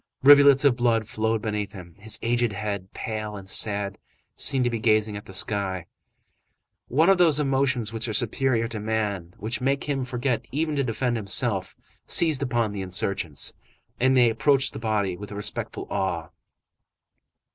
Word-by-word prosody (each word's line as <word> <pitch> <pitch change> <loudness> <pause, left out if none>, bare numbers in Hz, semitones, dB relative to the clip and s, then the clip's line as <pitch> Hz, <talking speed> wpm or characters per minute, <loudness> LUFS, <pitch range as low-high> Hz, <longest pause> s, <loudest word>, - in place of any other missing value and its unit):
Rivulets 140 0 +7
of 135 -4 +5
blood 115 -3 +1
flowed 110 0 -1
beneath 105 -2 -3
him. 90 -4 -11
His 110 +2 -1
aged 120 -1 +1
head, 100 -2 -4
pale 110 -1 -5
and 95 -1 -9
sad, 100 0 0 0.4
seemed 135 -2 +3
to 120 - +1
be 115 - -2
gazing 110 -1 +2
at 105 - -8
the - - -10
sky. 95 -3 -1 1.0
One 155 +7 +3
of 195 -1 +4
those 160 -4 +4
emotions 135 -5 0
which 115 +1 -2
are 110 - -3
superior 115 +1 +1
to 110 -2 -5
man, 105 -5 -3
which 110 +6 -4
make 135 +2 0
him 140 -3 -2
forget 125 -2 -2
even 155 +2 -1
to 140 - +2
defend 120 0 -1
himself, 100 -2 -1 0.3
seized 160 -5 +2
upon 120 -5 0
the 100 -1 -5
insurgents, 90 -5 -1 0.5
and 130 +1 +3
they 120 -2 +5
approached 135 +4 +2
the - - -6
body 105 -5 -1
with 105 +3 -9
respectful 105 0 -4
awe. 85 -4 -2
110 Hz, 165 wpm, -25 LUFS, 105-130 Hz, 1.0 s, Rivulets